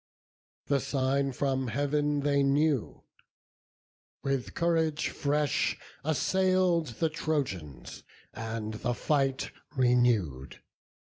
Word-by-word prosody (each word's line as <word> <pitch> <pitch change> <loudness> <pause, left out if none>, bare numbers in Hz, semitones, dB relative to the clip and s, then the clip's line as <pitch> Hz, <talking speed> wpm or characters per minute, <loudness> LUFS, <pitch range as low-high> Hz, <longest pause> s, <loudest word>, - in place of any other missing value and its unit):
The 140 -1 +2
sign 135 +1 0
from 130 0 -1
Heav'n 145 +3 0
they 140 0 +2
knew; 140 -2 +1 1.2
with 135 -2 -2
courage 165 -2 +1
fresh 145 -1 0 0.3
Assail'd 175 -2 +2
the 165 - +3
Trojans, 135 - -3 0.3
and 110 -1 -4
the 120 +2 -2
fight 135 -1 0 0.3
renew'd. 120 - +2
140 Hz, 85 wpm, -29 LUFS, 125-150 Hz, 1.2 s, the